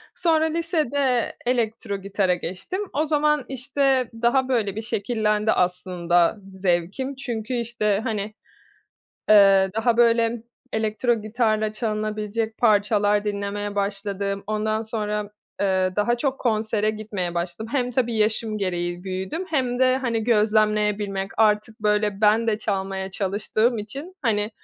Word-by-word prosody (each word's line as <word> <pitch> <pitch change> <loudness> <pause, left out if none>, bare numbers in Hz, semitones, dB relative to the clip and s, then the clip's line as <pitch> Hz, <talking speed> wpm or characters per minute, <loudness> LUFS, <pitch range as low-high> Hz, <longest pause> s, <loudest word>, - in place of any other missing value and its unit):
Sonra 320 -2 +2
lisede 300 -6 0
elektrogitara 200 -5 0
geçtim. 185 - -5
O 300 +3 +1
zaman, 300 -2 +2
işte, 265 -1 +1
daha, 255 +2 +3
böyle, 220 -7 0
bir 220 - -3
şekillendi 215 -1 0
aslında 180 0 +1
zevkim. 190 +8 -1
Çünkü, 240 -3 -4
işte, 230 -4 0
hani, 215 -3 -3 1.0
eee, 195 -2 +6
daha 225 +1 +2
böyle 230 -1 +3 0.3
elektrogitarla 220 0 0
çalınabilecek 215 0 -3
parçalar 210 -1 +3
dinlemeye 205 0 -3
başladım. 200 0 -2
Ondan 215 +1 -1
sonra, 210 -2 -3 0.3
eee, 185 -2 +1
daha 225 +4 +2
çok 270 +2 -1
konsere 215 -2 +1
gitmeye 205 -5 -4
başladım. 175 +5 -3
Hem 250 -3 0
tabii 240 -2 0
yaşım 215 0 0
gereği 175 -2 -2
büyüdüm 190 - -3
hem 255 -5 0
de, 255 0 +4
hani, 235 -4 -1
gözlemleyebilmek 210 -3 +1
Artık, 215 +1 +2
böyle, 210 -1 +1
ben 220 +2 +4
de 215 -2 +1
çalmaya 195 -2 -3
çalıştığım 215 +4 0
için, 275 - -7
hani, 210 -3 +1
215 Hz, 120 wpm, -23 LUFS, 200-240 Hz, 1.0 s, eee